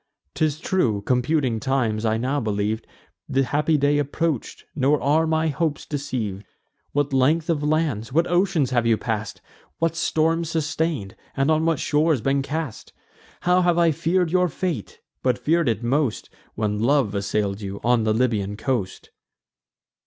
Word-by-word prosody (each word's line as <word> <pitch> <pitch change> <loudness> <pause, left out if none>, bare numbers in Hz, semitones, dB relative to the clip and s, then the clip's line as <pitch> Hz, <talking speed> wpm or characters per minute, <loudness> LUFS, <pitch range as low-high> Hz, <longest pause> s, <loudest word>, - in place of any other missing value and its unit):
'Tis 155 -1 0
true, 120 - 0
computing 125 0 +1
times, 120 -4 0
I 110 0 +2
now 130 +5 0
believ'd 110 -1 -2 0.4
The 135 - +2
happy 150 +4 +1
day 145 +1 +2
approach'd; 145 -1 -2
nor 145 +1 +2
are 155 +3 +2
my 160 0 +1
hopes 155 0 -2
deceiv'd. 120 -9 -4 0.5
What 145 -1 0
length 155 +6 +2
of 150 -3 -1
lands, 150 -6 0
what 165 +5 +3
oceans 175 -6 +1
have 120 -2 +2
you 115 -1 +4
pass'd; 110 -3 -4 0.4
What 165 0 0
storms 165 0 +1
sustain'd, 155 - -2 0.2
and 135 +3 +2
on 155 +1 +2
what 165 -2 +2
shores 150 0 +2
been 135 +4 +1
cast? 150 -3 -5 0.5
How 180 +1 +3
have 175 -1 +2
I 170 -1 +4
fear'd 170 +3 0
your 180 0 +3
fate! 160 - -4 0.2
but 125 -2 +1
fear'd 155 +3 +1
it 110 0 -2
most, 130 0 0 0.2
When 105 -1 -1
love 125 -2 +2
assail'd 100 0 -1
you, 100 0 -5
on 120 0 +3
the 110 - +1
Libyan 110 -4 0
coast." 115 -6 -3
140 Hz, 155 wpm, -23 LUFS, 115-160 Hz, 0.5 s, you